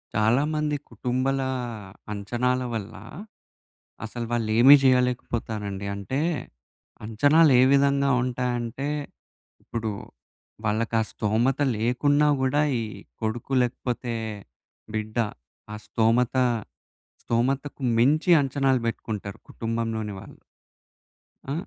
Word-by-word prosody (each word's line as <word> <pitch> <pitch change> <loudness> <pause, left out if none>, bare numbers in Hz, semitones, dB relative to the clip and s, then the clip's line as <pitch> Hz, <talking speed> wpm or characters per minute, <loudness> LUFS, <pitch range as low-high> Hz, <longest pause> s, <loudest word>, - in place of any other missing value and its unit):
చాలామంది 145 +7 +1
కుటుంబలా 130 +1 -1 0.6
అంచనాల 120 +5 -1
వల్లా, 100 -3 -6 1.0
అసలు 115 +1 -5
వాళ్ళేమీ 120 +4 +6
జెయ్యలేకపోతారండి. 115 -6 0
అంటే, 100 +7 -3 0.9
అంచనాలు 145 +8 +4
ఏ - - +6
విధంగా 140 0 +3
ఉంటాయంటే, 125 +1 -2 0.8
ఇప్పుడు 110 -2 -3 0.7
వాళ్ళకా 110 +1 0
స్థోమత 115 +6 0 0.2
లేకున్నా 145 +6 +2
గూడా 130 +3 +2 0.2
ఈ - - -2 0.4
కొడుకు 115 +4 -3
లేకపోతే 120 0 -3 0.8
బిడ్డ 110 +1 -4 0.6
ఆ - - -4
స్థోమత 115 +3 +1 0.9
స్థోమతకు 135 +5 -1 0.2
మించి 150 +8 +3
అంచనాలు 135 -1 +1
బెట్టుకుంటరు 105 -3 -5
కుటుంబంలోని 115 -2 -3
వాళ్ళు. - - -13 1.1
ఆ! - - -1
120 Hz, 85 wpm, -25 LUFS, 110-135 Hz, 1.1 s, వాళ్ళేమీ